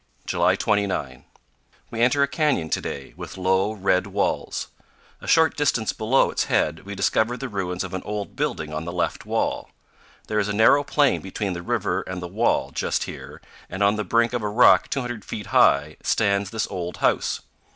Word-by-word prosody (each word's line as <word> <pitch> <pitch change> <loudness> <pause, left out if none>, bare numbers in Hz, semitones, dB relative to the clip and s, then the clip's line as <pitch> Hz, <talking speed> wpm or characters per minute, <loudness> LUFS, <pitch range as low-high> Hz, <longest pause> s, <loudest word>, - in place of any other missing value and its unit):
July - - +2
29. 95 -11 -1 0.7
We 115 - -3
enter 140 +4 +4
a - - +2
canyon 135 - 0
to - - 0
day, 70 - -6
with - - -9
low, 95 +2 +1
red 95 -2 +1
walls. 100 +1 -2 0.5
A - - -10
short 160 -2 +4
distance 130 -7 +1
below 115 +5 +2
its - - 0
head 80 +5 0
we 100 - -5
discover 110 +5 +1
the 135 - -5
ruins 95 -5 -3
of 95 - -7
an 95 - -3
old 105 -1 -5
building 75 0 -2
on 75 +1 -4
the 85 - -4
left 90 - -2
wall. - - -1 0.6
There 105 - -1
is 105 - 0
a 105 - -2
narrow 110 +7 +5
plain 145 -1 +2
between 95 +1 -3
the 85 - -5
river - - -1
and 95 0 -6
the 90 - -5
wall - - 0
just - - -1
here, - - -9 0.3
and 95 +3 -2
on 100 +1 +4
the 105 - -2
brink 115 +4 +2
of 120 - -1
a 105 - -2
rock 120 +4 +5
200 120 -5 -3
feet 105 -2 -6
high 75 +2 +4
stands 100 -2 +1
this 110 0 -2
old 90 -2 -4
house. - - +1
100 Hz, 195 wpm, -23 LUFS, 90-115 Hz, 0.7 s, narrow